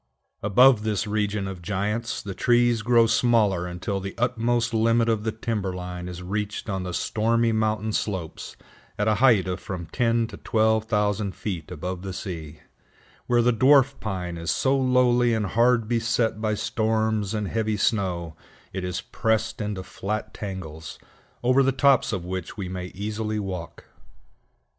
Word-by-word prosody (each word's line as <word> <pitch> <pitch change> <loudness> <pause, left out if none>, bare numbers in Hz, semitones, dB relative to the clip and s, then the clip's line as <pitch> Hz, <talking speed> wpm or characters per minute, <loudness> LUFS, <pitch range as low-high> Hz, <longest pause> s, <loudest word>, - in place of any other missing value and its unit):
Above 120 +3 +5
this 105 -2 -1
region 105 -1 -1
of 95 -2 -7
giants, 105 +5 -2
the 100 - -5
trees 120 +1 +3
grow 115 +1 +4
smaller 110 -6 +2
until 95 +3 -3
the 95 0 -6
utmost 120 -1 0
limit 115 +1 +3
of 110 -2 +1
the 110 - -1
timber 110 -4 -3
line 90 0 -6
is 90 0 -7
reached 105 +4 -3
on 95 -3 -2
the 90 0 -4
stormy 115 +5 +1
mountain 110 0 0
slopes 95 -8 -4 0.4
at 105 - 0
a 110 - +4
height 115 -9 +5
of 90 0 -2
from 90 -3 -6
ten 115 -2 +2
to 110 -2 -9
twelve 110 0 +1
thousand 105 -2 0
feet 90 -6 -5
above 90 +1 -5
the 95 0 -5
sea, 80 -6 -7 0.7
where 120 -1 +3
the 120 +1 +3
Dwarf 135 +3 +4
Pine 90 -4 -4
is 85 - -4
so 135 0 +2
lowly 125 -2 +3
and 110 -1 0
hard 115 +2 +2
beset 115 -1 0
by 110 -1 0
storms 110 -1 0
and 105 -2 -2
heavy 110 0 -1
snow, 90 -8 0 0.4
it 95 -1 -3
is 90 -1 -3
pressed 110 0 -1
into 105 -3 -3
flat 110 +3 -4
tangles, 80 -6 -7 0.5
over 130 +2 +4
the 135 0 +3
tops 135 -1 +3
of 95 -4 -3
which 90 +1 -5
we 95 -3 -4
may 90 0 -5
easily 105 +2 -3
walk. 95 -4 -6
105 Hz, 160 wpm, -25 LUFS, 95-115 Hz, 0.7 s, Above